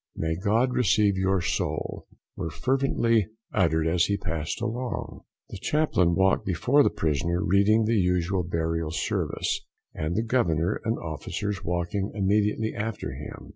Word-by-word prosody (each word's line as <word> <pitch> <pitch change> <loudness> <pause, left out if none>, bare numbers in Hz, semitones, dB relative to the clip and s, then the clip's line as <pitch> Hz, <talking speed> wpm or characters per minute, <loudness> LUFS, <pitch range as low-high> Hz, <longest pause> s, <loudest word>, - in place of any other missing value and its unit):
"May 80 0 -1
God 110 +8 +1
receive 105 -3 +3
your 95 0 +1
soul!" - - -2 0.3
were 80 - -3
frequently 115 - +1 0.3
uttered 80 -5 +2
as 85 +1 +3
he 100 - 0
passed 80 -5 -3
along. 120 +1 -4 0.3
The - - -8
chaplain 95 - +2
walked 95 +1 +3
before 120 - +3
the - - +4
prisoner, 85 +4 -1
reading 105 +3 +4
the 110 -1 +2
usual 90 +1 +1
Burial 80 -1 -2
Service, 80 - -1 0.3
and 80 +3 -3
the 110 - +1
Governor 90 -9 +1
and 115 +2 0
Officers 85 +5 -4
walking 90 +4 -1
immediately 105 +2 +1
after 105 -11 -4
him. 75 +3 -9
95 Hz, 140 wpm, -26 LUFS, 85-110 Hz, 0.3 s, the